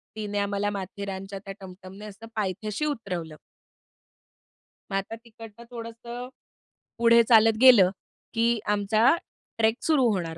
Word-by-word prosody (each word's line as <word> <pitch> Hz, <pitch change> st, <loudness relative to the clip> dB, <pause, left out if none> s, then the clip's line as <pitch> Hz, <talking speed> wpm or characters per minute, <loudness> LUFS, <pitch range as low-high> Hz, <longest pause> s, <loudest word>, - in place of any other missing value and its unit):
तिने 205 Hz, -1 st, -4 dB
आम्हाला 200 Hz, 0 st, -1 dB
माथेरानच्या 195 Hz, 0 st, -6 dB
त्या 195 Hz, -, -6 dB
टमटमने 190 Hz, +2 st, -11 dB
असं 215 Hz, +2 st, -11 dB
पायथ्याशी 210 Hz, -, -2 dB
उतरवलं. 180 Hz, -, -4 dB, 1.6 s
मग -, -, -2 dB
आता 195 Hz, +3 st, -4 dB
तिकडनं 225 Hz, 0 st, -13 dB
थोडंसं 235 Hz, +1 st, -8 dB, 0.7 s
पुढे 235 Hz, 0 st, +6 dB
चालत 225 Hz, -1 st, +6 dB
गेलं, 230 Hz, -8 st, +8 dB, 0.4 s
की 230 Hz, 0 st, +1 dB
आमचा 215 Hz, +8 st, +3 dB, 0.4 s
ट्रेक 225 Hz, 0 st, +3 dB
सुरू 280 Hz, -6 st, +3 dB
होणार 165 Hz, -3 st, -4 dB
215 Hz, 115 wpm, -26 LUFS, 195-230 Hz, 1.6 s, गेलं